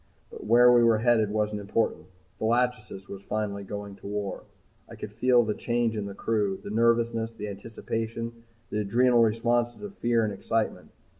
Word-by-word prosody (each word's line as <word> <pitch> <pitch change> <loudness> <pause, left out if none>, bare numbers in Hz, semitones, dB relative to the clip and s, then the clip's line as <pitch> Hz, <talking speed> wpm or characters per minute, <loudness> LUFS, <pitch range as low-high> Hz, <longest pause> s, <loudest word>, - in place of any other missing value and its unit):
But - - -9
where 120 +2 +7
we 120 - +6
were 115 -1 +5
headed 110 -2 +3
wasn't 105 0 -1
important. 100 -4 -1 0.3
The - - -2
"Lachesis" 115 -4 -1
was 100 -1 -8
finally 100 -1 -3
going 100 0 -7
to - - -10
war! 100 -2 -4 0.4
I - - -10
could 105 - -7
feel 120 +2 +4
the 105 -1 -1
change 120 0 -1
in 105 -2 -3
the 100 - -8
crew, 105 -4 -1
the 100 - -6
nervousness, 115 0 +2
the 105 -2 -6
anticipation, 115 +3 -5 0.4
the 105 - -1
adrenal 120 +4 +3
responses 120 - +1
of 205 -1 -7
fear 120 -1 +2
and 105 - -2
excitement. 110 +3 -2
110 Hz, 175 wpm, -27 LUFS, 105-120 Hz, 0.4 s, where